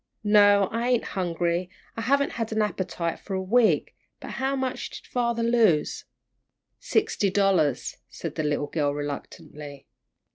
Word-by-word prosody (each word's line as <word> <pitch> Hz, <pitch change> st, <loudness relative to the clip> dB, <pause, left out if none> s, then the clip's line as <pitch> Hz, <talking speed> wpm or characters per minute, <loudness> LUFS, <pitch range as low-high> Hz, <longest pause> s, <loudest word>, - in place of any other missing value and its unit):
"No, 205 Hz, -1 st, +5 dB
I 230 Hz, +2 st, -1 dB
ain't 245 Hz, -2 st, +2 dB
hungry; 175 Hz, -1 st, -1 dB, 0.3 s
I 225 Hz, -, -4 dB
haven't 280 Hz, +5 st, +2 dB
had 225 Hz, -1 st, -3 dB
an 220 Hz, 0 st, +2 dB
appetite 180 Hz, -5 st, -3 dB
for 195 Hz, -, -5 dB
a 190 Hz, -, -2 dB
week. 230 Hz, +4 st, +2 dB, 0.2 s
How 270 Hz, +1 st, -2 dB
much 260 Hz, -1 st, -3 dB
did -, -, -10 dB
father 235 Hz, -2 st, 0 dB
lose?" 225 Hz, -10 st, +2 dB, 0.7 s
"Sixty 410 Hz, -, +1 dB
dollars," 190 Hz, -9 st, +1 dB
said 145 Hz, +4 st, -6 dB
the 160 Hz, -, -2 dB
little 150 Hz, 0 st, 0 dB
girl, 145 Hz, -1 st, -1 dB
reluctantly. 145 Hz, 0 st, -7 dB
195 Hz, 140 wpm, -26 LUFS, 160-230 Hz, 0.7 s, No